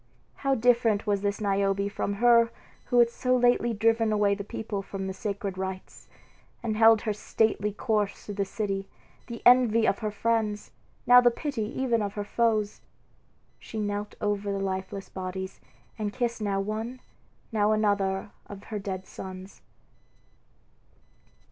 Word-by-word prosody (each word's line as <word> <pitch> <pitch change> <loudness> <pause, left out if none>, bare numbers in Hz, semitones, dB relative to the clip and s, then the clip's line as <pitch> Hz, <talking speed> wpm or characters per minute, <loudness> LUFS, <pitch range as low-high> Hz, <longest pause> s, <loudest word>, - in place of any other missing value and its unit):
how 275 -1 +1
different 230 -3 +3
was 205 -2 +1
this 200 0 -1
Niobe 200 -1 +1
from 200 - -2
her 235 +2 +5 0.4
who 245 - 0
had 235 -1 +6
so 255 +1 +1
lately 245 -1 +3
driven 225 0 +2
away 205 -1 +3
the 200 0 -4
people 205 0 -4
from 195 0 -6
the 190 - -3
sacred 200 -1 -4
rites, 190 0 -6 0.6
and 220 -2 -1
held 225 -1 +6
her 215 - -1
stately 210 0 0
course 210 -1 -1
through 205 - -5
the 200 0 0
city, 195 -1 -3 0.4
the 235 -2 -8
envy 240 -3 +6
of 200 - +1
her 215 - -2
friends, 210 -1 -1 0.3
now 245 +1 +8
the 245 - +6
pity 275 0 -4 0.2
even 240 -4 +1
of 200 -1 -3
her 205 - -2
foes! 215 -1 0 0.8
She 220 - -7
knelt 205 0 -3
over 205 -1 -1
the 200 - -1
lifeless 190 0 -4
bodies, 190 0 -6 0.4
and 210 -1 -2
kissed 235 0 -2
now 200 -2 0
one, 220 +5 -4 0.5
now 210 -1 +2
another 205 -2 +1 0.2
of 200 -1 -10
her 215 -2 -5
dead 190 -1 -5
sons. 190 +1 -9
210 Hz, 155 wpm, -27 LUFS, 200-230 Hz, 0.8 s, now